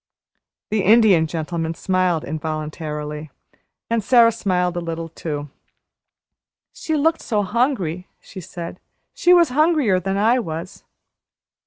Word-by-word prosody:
The 215 Hz, -1 st, +1 dB
Indian 200 Hz, -5 st, +5 dB
Gentleman 165 Hz, 0 st, -3 dB
smiled 185 Hz, -3 st, 0 dB
involuntarily, 155 Hz, 0 st, -5 dB, 0.6 s
and 230 Hz, -2 st, 0 dB
Sara 235 Hz, +1 st, +5 dB
smiled 180 Hz, -5 st, -1 dB
a 175 Hz, -, -2 dB
little 165 Hz, 0 st, -5 dB
too. 150 Hz, -3 st, -6 dB, 1.2 s
"She 315 Hz, -, -3 dB
looked 320 Hz, +2 st, +1 dB
so 210 Hz, -3 st, -1 dB
hungry," 190 Hz, -, -1 dB
she 190 Hz, -, -11 dB
said. 170 Hz, +1 st, -8 dB, 0.3 s
"She 350 Hz, -, +2 dB
was 345 Hz, -3 st, +6 dB
hungrier 295 Hz, -, +2 dB
than 195 Hz, +2 st, -2 dB
I 230 Hz, +5 st, +3 dB
was." 165 Hz, -3 st, -6 dB
185 Hz, 120 wpm, -21 LUFS, 160-230 Hz, 1.2 s, was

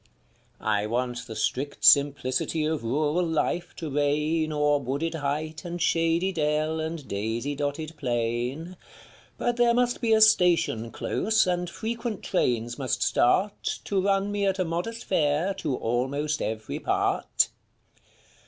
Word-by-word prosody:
I 105 Hz, -1 st, 0 dB
want 125 Hz, +1 st, -2 dB
the 110 Hz, -, -7 dB
strict 130 Hz, -4 st, -2 dB
simplicity 140 Hz, +4 st, +3 dB
of 155 Hz, -4 st, -1 dB
rural 150 Hz, +8 st, +1 dB
life 170 Hz, +1 st, -1 dB
to 160 Hz, -3 st, -5 dB
reign 150 Hz, +3 st, +1 dB
O'er 150 Hz, -1 st, +2 dB
wooded 140 Hz, +5 st, -2 dB
height 155 Hz, +1 st, -3 dB
and 175 Hz, 0 st, -5 dB
shady 165 Hz, +2 st, +2 dB
dell 155 Hz, -1 st, 0 dB
and 160 Hz, -2 st, -4 dB
daisy 110 Hz, +7 st, -2 dB
dotted 145 Hz, +3 st, -3 dB
plain; 125 Hz, +7 st, -2 dB, 0.6 s
But 240 Hz, 0 st, -1 dB
there 240 Hz, -1 st, +4 dB
must 245 Hz, 0 st, +1 dB
be 230 Hz, -2 st, +1 dB
a 220 Hz, -, +4 dB
station 175 Hz, -, +4 dB
close 220 Hz, -, +1 dB
and 180 Hz, -1 st, -1 dB
frequent 230 Hz, +3 st, -4 dB
trains 120 Hz, -, 0 dB
must 130 Hz, -3 st, 0 dB
start 195 Hz, +11 st, +1 dB
To 195 Hz, -2 st, 0 dB
run 195 Hz, +1 st, +1 dB
me 205 Hz, -1 st, 0 dB
at 190 Hz, -1 st, +1 dB
a 185 Hz, -, 0 dB
modest 175 Hz, +8 st, -3 dB
fare 160 Hz, +2 st, +1 dB
to 145 Hz, -5 st, -1 dB
almost 140 Hz, +7 st, -1 dB
every 110 Hz, -1 st, -3 dB
part. -, -, +1 dB
155 Hz, 140 wpm, -26 LUFS, 130-180 Hz, 0.6 s, there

